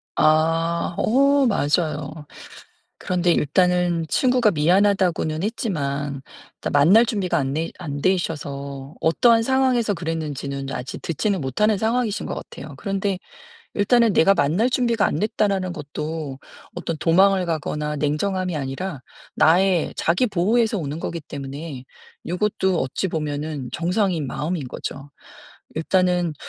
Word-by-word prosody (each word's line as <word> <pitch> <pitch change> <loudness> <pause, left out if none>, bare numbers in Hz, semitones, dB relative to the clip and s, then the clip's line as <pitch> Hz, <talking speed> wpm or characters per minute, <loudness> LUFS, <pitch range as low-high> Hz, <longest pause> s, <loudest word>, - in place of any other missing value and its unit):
아 165 +2 +2
어 275 +4 +3
맞아요. 150 -4 -1 0.8
그런데 180 -1 +1
일단은 175 +2 +2
친구가 250 - +3
미안하다고는 175 -1 +2
했지만 145 - -2 0.4
일단 - - -4
만날 180 +12 +6
준비가 195 -6 -1
안되 145 +4 -2
안되셔서 145 -4 -3
어떠한 225 +8 +4
상황에서 255 -4 +2
그랬는지는 150 -5 -4
아직 125 +1 -6
듣지는 190 +4 -1
못하는 210 - +1
상황이신 225 0 0
것 - - -3
같아요. 145 0 -9
그런데 195 +5 -2 0.6
일단은 230 +1 +3
내가 195 +4 +5
만날 175 - +2
준비가 235 -4 +1
안 - - -1
됐다라는 200 -3 0
것도 150 -2 -5 0.4
어떤 175 -2 -3
도망을 190 +3 +4
가거나 150 -2 -2
냉정함이 180 +5 -1
아니라 140 +2 -4 0.3
나의 180 +1 +3
자기 175 +10 +2
보호에서 220 +4 +1
오는 150 -2 -4
거기 170 0 -4
때문에 140 -1 -7 0.4
요것도 190 0 0
어찌 130 +8 -2
보면은 150 -4 -3
정상인 175 -3 0
마음인 150 +3 -3
거죠. 135 +3 -7 0.7
일단은 180 0 +1
170 Hz, 300 characters per minute, -22 LUFS, 150-200 Hz, 0.8 s, 만날